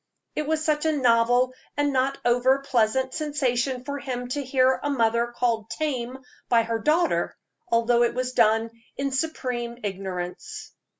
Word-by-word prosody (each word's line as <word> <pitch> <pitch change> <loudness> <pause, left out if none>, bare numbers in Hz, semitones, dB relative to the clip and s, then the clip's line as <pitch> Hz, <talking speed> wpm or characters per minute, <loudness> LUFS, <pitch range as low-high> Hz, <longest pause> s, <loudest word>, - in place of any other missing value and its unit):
It 305 -1 -2
was 315 0 0
such 305 0 +1
a - - +3
novel 245 0 +3 0.2
and 290 -1 +1
not 265 +1 +1
over 245 +2 +4
pleasant 260 -1 +1
sensation 265 -4 -1
for 285 +2 -4
him 250 -3 -4
to 285 +3 -2
hear 260 0 +2
a 290 - -2
mother 235 -3 +2
called 235 -2 -1
"tame" 260 -5 -3 0.3
by 230 -1 +4
her 230 0 -2
daughter, 315 +7 +1 0.3
although 235 +1 +3
it 235 0 +2
was 255 0 -2
done 225 -1 +3 0.3
in 275 0 -1
supreme 250 -4 -2
ignorance. 190 -3 -5
250 Hz, 155 wpm, -25 LUFS, 235-275 Hz, 0.3 s, over